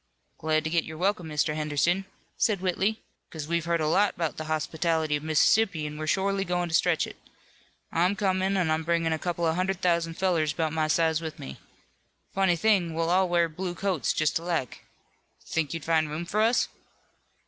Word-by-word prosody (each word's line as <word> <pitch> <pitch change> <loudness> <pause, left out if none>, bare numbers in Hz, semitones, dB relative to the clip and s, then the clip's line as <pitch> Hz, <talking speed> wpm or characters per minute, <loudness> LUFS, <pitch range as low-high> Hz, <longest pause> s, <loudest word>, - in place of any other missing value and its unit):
"Glad 155 0 +1
to 160 - -3
get 170 -1 +2
your 160 0 -8
welcome, 185 -1 0
Mr. 150 0 0
Henderson," 155 +5 0 0.3
said 210 -4 +1
Whitley, 190 +4 -1 0.3
"'cause 155 -2 -6
we've 170 0 -1
heard 170 -1 +1
a 155 - +1
lot 195 +5 +2
'bout 165 -3 -1
the 155 - -5
hospitality 155 0 0
of 145 - -3
Mississippi, 160 +3 +2
an' 150 0 -5
we're 155 - -4
shorely 195 +3 +1
goin' 175 -1 -1
to - - -6
stretch 170 -1 +3
it. - - -10 0.7
I'm 180 +4 +2
comin', 190 -1 +1
an' 175 -4 +1
I'm 155 0 +1
bringin' 165 0 +1
a 160 - -2
couple 175 0 -2
of 160 - +2
hundred 185 +1 -1
thousand 170 -2 +1
fellers 165 -6 +1
'bout 160 0 -1
my 155 -1 +1
size 160 0 +2
with 160 -1 -6
me. 65 0 -9 0.7
Funny 190 -2 +3
thing, 175 -3 +2
we'll 165 +1 0
all 185 0 +3
wear 170 -1 +3
blue 175 +2 -5
coats 180 -8 0
just 155 0 +1
alike. 165 -7 -3 0.6
Think 155 -4 -1
you'd 165 -2 -5
find 160 -2 +2
room 155 +3 -4
for 205 +4 0
us?" 230 +3 +3
170 Hz, 195 wpm, -27 LUFS, 155-185 Hz, 0.7 s, stretch